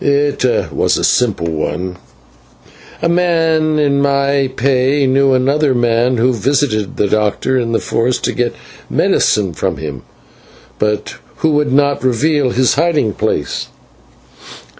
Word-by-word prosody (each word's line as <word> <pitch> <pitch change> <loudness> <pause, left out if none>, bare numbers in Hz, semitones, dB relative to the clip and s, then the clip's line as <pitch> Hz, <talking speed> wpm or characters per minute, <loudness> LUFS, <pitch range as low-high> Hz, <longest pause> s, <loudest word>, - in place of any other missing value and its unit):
"It 145 0 +1 0.3
was - - +1
a - - -3
simple 110 -9 +1
one, 90 +3 -3 1.1
a - - +3
man 165 -3 +1
in 140 -2 +1
my 140 -1 +1
pay 135 +2 +1
knew 135 +1 +3
another 135 +2 +1
man 120 +1 +1
who 125 +3 +2
visited 120 -3 -1
the - - +1
doctor 110 +5 0
in 115 -1 -2
the 115 - +1
forest 120 +2 -1
to - - 0
get 120 -1 -2 0.3
medicine 100 -5 +1
from - - -2
him, 75 -4 -6 0.8
but 105 0 -2 0.3
who 160 - +3
would 150 -2 +1
not 140 0 +1
reveal 140 +2 +1
his 125 +1 +2
hiding 150 -9 +1
place. - - -2
130 Hz, 135 wpm, -15 LUFS, 115-145 Hz, 1.1 s, a